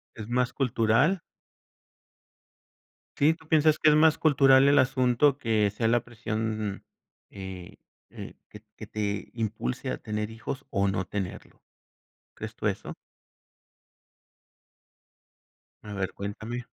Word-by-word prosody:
¿Es 110 -1 -8
más 125 +1 0
cultural? 130 - +2 2.0
Sí. 150 +3 +4
¿Tú 160 -1 -20
piensas 155 -1 +3
que 155 - +5
es - - +5
más 155 0 +5
cultural 135 -3 +5
el 140 +1 +5
asunto 130 +2 +2
que 110 -6 +1
sea 110 +3 -2
la 120 +1 +3
presión, 110 -3 -4 0.5
eh 95 -2 -9 0.3
eh, - - -9
que - - -12 0.2
que - - -9
te 105 -1 -3
impulse 110 - -3
a - - -3
tener 105 0 -4
hijos 130 +5 -6
o 100 0 +1
no 95 -1 -1
tenerlo? 95 -2 -6 0.7
¿Crees - - -7
tú - - -5
eso? - - -2 2.9
A 105 - -8
ver, 95 -2 -3
cuéntame. 110 +4 -6
115 Hz, 120 wpm, -27 LUFS, 105-135 Hz, 2.9 s, que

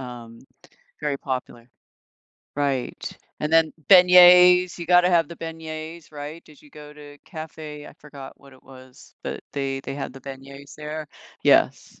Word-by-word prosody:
um, 120 -2 -10 0.6
very 145 -2 -2
popular. 125 -3 -6 0.9
Right, 140 -3 -3 0.2
and 150 +1 -3
then 165 -1 +4 0.2
beignets, 180 -1 +7
you 170 - -7
gotta 180 +1 +5
have 170 -4 +2
the 170 - -10
beignets, 160 0 -8
right, 150 +2 -9
did 150 -2 -19
you 150 - -20
go 150 0 -13
to 145 -1 -14
cafe 155 -2 -9
I - - -12
forgot 140 -2 -12
what 140 -1 -18
it 130 - -20
was, 130 -1 -17
but - - -6
they 135 -1 -3
they 135 0 -7
had 135 -2 -6
the 135 - -13
beignets 140 +2 -11
there, 150 0 -7 0.4
yes. - - +2
150 Hz, 155 wpm, -23 LUFS, 135-165 Hz, 0.9 s, beignets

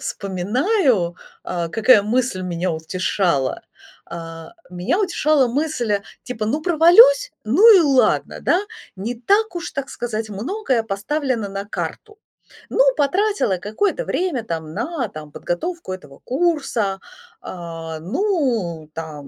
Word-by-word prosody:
вспоминаю, 205 - 0 0.3
а, 170 -2 -3
какая 225 +2 +5
мысль 235 -2 0
меня 175 0 -2
утешала. 160 -3 -1 0.4
А, 165 - -8 0.2
меня 180 - -1
утешала 310 -8 +2
мысль, 240 -6 -1 0.2
типа: 230 -4 -4
"Ну 290 +8 0
провалюсь, 450 +10 +6
ну 390 - +7
и - - +6
ладно, 275 -5 +2
да. 355 - +2 0.4
Не 220 +6 -4
так 400 - +1
уж, 345 0 -4
так 275 0 -4
сказать, 220 -2 -4
многое 255 - -1
поставлено 225 +2 -2
на 195 0 -5
карту. 425 - -6 0.5
Ну, - - -1 0.2
потратила 360 - +1
какое-то 360 - -1
время 335 -11 -1
там 160 -5 -5
на, 245 - -3
там, 150 -3 -10
подготовку 330 - -4
этого 145 -7 -10
курса. 260 - 0 0.4
А, 165 -2 -7
ну, 220 - -1
там, 155 -3 -7
230 Hz, 120 wpm, -21 LUFS, -, 0.5 s, ну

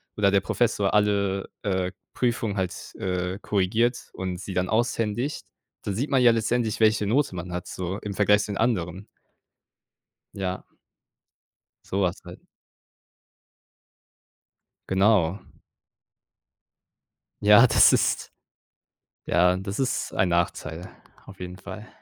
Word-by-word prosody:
oder 100 -2 +3
der 100 - +4
Professor 100 -1 0
alle, 100 -2 +1
äh, 95 -2 -1 0.2
Prüfungen 115 -4 -1
halt, 95 -2 -4
äh, 90 0 -2
korrigiert 110 +5 0
und 90 -1 -4
sie 100 0 -7
dann 90 0 -1
aushändigt. 115 +4 -1 0.4
Da 100 - -3
sieht 125 +9 -2
man 130 -2 +3
ja 120 -1 +7
letztendlich, 115 0 0
welche 110 -1 +3
Note 120 -2 +1
man 90 +1 -6
hat, 90 0 -5
so 90 +2 -4
im 105 - -6
Vergleich 105 +1 +3
zu - - -5
den - - -4
anderen. 100 -4 -1 1.3
Ja. 95 -1 -4 1.2
Sowas 95 -1 -1
halt. 90 +1 -11 2.5
Genau. 95 -2 +3 2.0
Ja, 105 +4 +7
das - - +6
ist - - +1 0.9
ja, 90 +1 +3
das 100 +2 -5
ist 130 -2 -1
ein 95 - +1
Nachteil 85 -1 -2 0.4
auf 95 - -13
jeden 90 0 -7
Fall. - - -9
100 Hz, 115 wpm, -25 LUFS, 90-110 Hz, 2.5 s, ja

